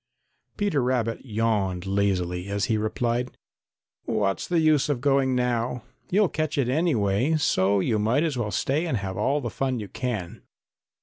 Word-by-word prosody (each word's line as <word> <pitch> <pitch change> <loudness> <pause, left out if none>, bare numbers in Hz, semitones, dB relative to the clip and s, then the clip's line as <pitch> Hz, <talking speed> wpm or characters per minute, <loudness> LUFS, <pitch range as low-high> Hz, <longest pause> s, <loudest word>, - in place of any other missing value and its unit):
Peter 200 -9 +1
Rabbit 120 -2 -1
yawned 105 -6 -1
lazily 95 -2 0
as 100 0 -1
he 110 - +1
replied: 120 +3 -1 0.7
"What's 100 -2 -1
the 175 - +1
use 155 -3 +3
of 140 -4 0
going 135 -1 +2
now? 125 -1 -1 0.3
You'll 205 +2 +3
catch 155 -1 -2
it 130 -3 +1
anyway, 130 - +1
so 100 -9 +2
you 110 +3 +1
might 115 +8 +2
as 160 -4 -1
well 120 -4 -2
stay 135 - 0
and 130 - 0
have 95 -2 -4
all 130 +6 0
fun 130 +1 -2
you 105 - -6
can. 110 -9 -4
120 Hz, 160 wpm, -25 LUFS, 100-140 Hz, 0.7 s, use